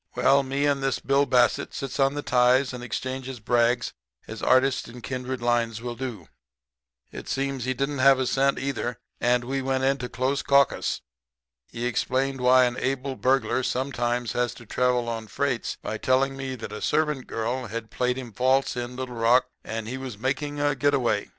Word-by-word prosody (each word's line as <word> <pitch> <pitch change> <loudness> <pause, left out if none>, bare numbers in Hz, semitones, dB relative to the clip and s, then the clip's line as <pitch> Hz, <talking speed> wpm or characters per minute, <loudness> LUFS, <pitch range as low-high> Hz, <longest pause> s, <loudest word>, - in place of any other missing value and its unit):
"Well, 140 +1 +4
me 135 +2 -1
and 140 -1 +1
this 135 -1 0
Bill 140 +1 +2
Bassett 125 -2 +2
sits 135 -1 -5
on 135 +1 +3
the 145 - -3
ties 125 +2 +3
and 125 -1 -6
exchanges 130 +1 -4
brags 120 +1 +1 0.3
as - - -7
artists 130 +1 +3
in 120 +1 -10
kindred 130 -1 -4
lines 120 -2 +1
will 120 +1 -5
do. 120 -9 -6 0.8
It - - -8
seems 135 -2 -2
he 130 0 -1
didn't 140 +2 -2
have 135 0 +6
a 130 - 0
cent, 135 +2 +2
either, 125 -3 -3 0.2
and 120 0 +2
we 135 +2 -2
went 130 0 -1
into 135 -2 0
close 135 +2 -1
caucus. 140 -1 +2 0.7
He 120 +1 -5
explained 130 +2 0
why 125 0 +6
an 120 0 -2
able 135 +1 -2
burglar 130 0 +1
sometimes 120 -3 -1
had 120 0 +1
to 120 - -13
travel 125 +1 +1
on 115 -1 -4
freights 130 +3 -2
by 110 - -5
telling 135 +1 +2
me 135 -1 -4
that 115 -4 -7
a 105 - -6
servant 150 -3 0
girl 120 +3 -2
had 110 +1 -6
played 125 0 0
him 125 -4 -7
false 130 +3 +2
in 120 0 -4
Little 130 -1 -5
Rock, 120 +3 +4
and 110 0 -5
he 130 +3 -4
was 130 -5 -6
making 140 +5 -2
a 145 0 +2
quick 145 - -3
get 145 0 +3
away. 115 -6 0
130 Hz, 190 wpm, -25 LUFS, 120-135 Hz, 0.8 s, have